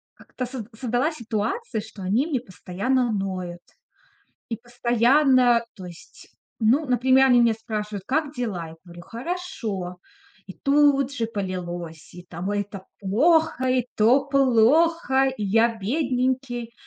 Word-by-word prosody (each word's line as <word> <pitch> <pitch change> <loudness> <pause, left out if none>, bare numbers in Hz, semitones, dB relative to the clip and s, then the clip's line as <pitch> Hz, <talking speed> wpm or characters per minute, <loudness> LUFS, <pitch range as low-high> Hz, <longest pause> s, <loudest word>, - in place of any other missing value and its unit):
как-то 255 - -7
со 250 -3 -7
создалась 250 +6 -1
ситуация, 225 - -3
что 210 -2 -11
они 220 - +1
мне 285 -6 -1
постоянно 240 +4 -2
ноют 185 -4 -4 0.9
и 230 - -2
постоянно 245 +1 +3
То 190 -3 -10
есть, 175 -2 -14 0.3
ну, 245 +8 +3
например, 260 +2 +4
они 245 -2 +5
меня 235 -1 +4
спрашивают: 210 -3 -5
"Как 295 +1 -1
дела?" 210 - -4
Я 160 - -12
говорю: 175 0 -12
"Хорошо." 230 - -5 0.5
И 190 - -8
тут 275 0 +3
же 230 -5 -2
полилось. 175 -6 -6
И 180 - -11
там: 175 +2 -6
"Ой, 205 0 0
это 200 -1 -9
плохо, 295 - +2
и 255 -1 +1
то 245 +6 +4
плохо, 275 +2 +3
и 215 - -3
я 225 +3 +2
бедненький." 250 0 -2
235 Hz, 135 wpm, -24 LUFS, 200-265 Hz, 0.9 s, они